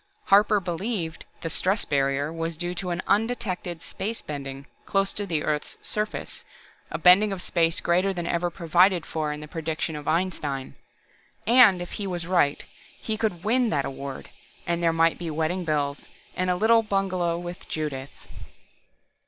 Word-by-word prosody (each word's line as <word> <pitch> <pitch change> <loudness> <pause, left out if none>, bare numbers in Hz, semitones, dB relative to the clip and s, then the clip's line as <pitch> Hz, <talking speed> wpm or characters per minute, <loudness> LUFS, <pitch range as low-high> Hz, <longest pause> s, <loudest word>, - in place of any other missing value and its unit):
Harper 210 +1 +6
believed 180 -1 -3 0.2
the 165 - -2
"stress 190 +6 +1
barrier" 140 +1 0
was 165 -1 -3
due 175 +1 -2
to 180 0 -4
an 175 +1 -2
undetected 200 -6 -1
space 225 +3 -4
bending 140 -2 -6 0.2
close 195 0 +1
to 205 -1 -3
the 160 -4 -1
earth's 150 -1 -2
surface, 210 0 -2 0.5
a - - -3
bending 200 +4 +6
of 195 - -3
space 165 -2 +2
greater 180 +3 +2
than 175 -3 -4
ever 175 +1 0
provided 175 +1 +3
for 155 -2 -2
in 150 0 -5
the 150 - -8
prediction 160 0 -3
of 150 -1 -7
Einstein. 155 -6 -1 0.7
And 225 -7 +6
if 175 - -10
he 205 - -3
was 175 -3 -3
right, 170 -5 +2 0.4
and 215 -1 -1
could 190 -6 -1
win 240 +3 +2
that 145 -6 0
award, 135 0 -7 0.3
then 170 0 -1
there 165 -1 +3
might 165 0 +2
be 170 -2 -4
wedding 160 +4 -1
bells, 145 -2 -1 0.3
and 185 0 0
a 180 - +2
little 225 +4 +5
bungalow 185 -5 0
with 175 +1 -7
Judith.... 140 -4 -5
175 Hz, 165 wpm, -26 LUFS, 155-195 Hz, 0.7 s, Harper